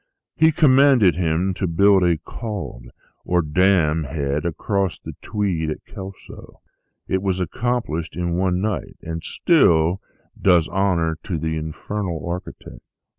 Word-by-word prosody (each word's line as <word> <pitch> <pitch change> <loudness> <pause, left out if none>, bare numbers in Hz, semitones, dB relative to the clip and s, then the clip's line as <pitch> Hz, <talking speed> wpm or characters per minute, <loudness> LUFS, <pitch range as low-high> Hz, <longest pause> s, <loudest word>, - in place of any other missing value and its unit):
He 160 +1 +4
commanded 135 - +5
him 85 +3 0
to 95 +1 -2
build 95 +3 +4
a 85 -2 +3
'cauld,' 100 - -7 0.3
or 90 -1 +1
dam 80 -1 +2
head 70 +2 -2
across 95 +2 -2
the - - -9
Tweed 95 -7 -2
at 75 - -6
Kelso; 95 0 -11 0.5
it 95 - 0
was 95 -2 -1
accomplished 90 -4 -2
in 85 0 -2
one 90 0 +1
night, 105 -2 -3
and 80 0 -5
still 90 - +3 0.4
does 90 -4 +4
honor 85 -5 0
to 90 -5 -3
the 80 +1 -2
infernal 80 +2 -4
architect. 90 +1 -7
90 Hz, 130 wpm, -21 LUFS, 80-100 Hz, 0.5 s, commanded